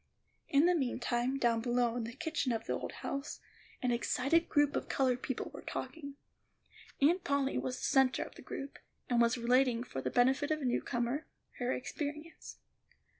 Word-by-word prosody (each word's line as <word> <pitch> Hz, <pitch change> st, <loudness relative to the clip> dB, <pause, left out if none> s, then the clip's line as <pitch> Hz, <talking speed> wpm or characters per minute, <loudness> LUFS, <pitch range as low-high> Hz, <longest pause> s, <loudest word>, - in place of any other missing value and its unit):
In 285 Hz, +3 st, +5 dB
the 360 Hz, -, +5 dB
meantime, 250 Hz, -3 st, 0 dB
down 235 Hz, -3 st, +2 dB
below, 240 Hz, 0 st, +1 dB
in 240 Hz, -2 st, -2 dB
the 230 Hz, -, -6 dB
kitchen 310 Hz, -3 st, -1 dB
of 225 Hz, -, -2 dB
the -, -, -1 dB
old -, -, -3 dB
house, 275 Hz, +1 st, -4 dB, 0.4 s
an 250 Hz, -, +2 dB
excited 270 Hz, +7 st, +2 dB
group 290 Hz, -1 st, +3 dB
of -, -, -2 dB
colored 255 Hz, -2 st, +1 dB
people 260 Hz, -, -3 dB
were -, -, -8 dB
talking. 280 Hz, -4 st, -6 dB, 0.9 s
Aunt 345 Hz, +6 st, +4 dB
Polly 280 Hz, -1 st, +1 dB
was 255 Hz, 0 st, -3 dB
the -, -, -3 dB
centre 265 Hz, -1 st, +3 dB
of -, -, -11 dB
the -, -, -12 dB
group, 275 Hz, +1 st, -7 dB, 0.3 s
and 240 Hz, -1 st, +4 dB
was 235 Hz, +1 st, +3 dB
relating, 245 Hz, 0 st, +3 dB
for 135 Hz, -, -5 dB
the 130 Hz, -, -1 dB
benefit 265 Hz, -, +3 dB
of 310 Hz, 0 st, +1 dB
a 280 Hz, -, -4 dB
new 245 Hz, -, +1 dB
comer, 240 Hz, +4 st, -2 dB, 0.3 s
her 245 Hz, 0 st, 0 dB
experience. 300 Hz, +5 st, -5 dB
260 Hz, 180 wpm, -33 LUFS, 240-285 Hz, 0.9 s, In